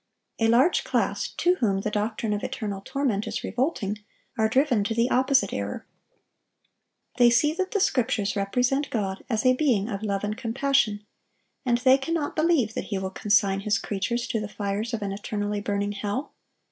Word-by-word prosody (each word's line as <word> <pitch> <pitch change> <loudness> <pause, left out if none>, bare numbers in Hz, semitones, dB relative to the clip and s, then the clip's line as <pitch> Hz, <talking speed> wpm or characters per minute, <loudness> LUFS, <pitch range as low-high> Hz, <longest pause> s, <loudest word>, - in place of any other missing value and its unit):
A 225 - +3
large 250 +9 +4
class - - 0
to 360 +1 +1
whom 195 -5 +1
the 210 - -2
doctrine 215 +1 -1
of 205 - -3
eternal 200 -4 -4
torment 250 -7 -1
is - - -4
revolting, 235 - -1 0.4
are 220 -1 +2
driven 255 -3 +2
to 225 - -1
the 235 +2 +1
opposite 265 +2 +3
error. - - -4 1.3
They 245 -2 +7
see 295 +6 +3
that 375 +2 -2
the 410 - 0
Scriptures 225 - +1
represent 250 +8 0
God 195 -4 -3
as 220 0 0
a 255 - +6
being 250 -7 +1
of 200 -3 -4
love 200 -2 -2
and 210 0 -2
compassion, 230 -3 0 0.6
and 240 -1 +3
they 260 +2 +5
cannot 310 +1 -2
believe 310 -9 +2
that - - -4
He 200 - -3
will 190 0 -3
consign 200 -1 +2
His 205 0 +1
creatures 210 +5 -2
to 225 - 0
the 210 - -4
fires 210 +2 -3
of 215 - -5
an 200 - -2
eternally 205 +1 -3
burning 205 0 -1
hell. 205 +6 -4
220 Hz, 180 wpm, -26 LUFS, 205-260 Hz, 1.3 s, They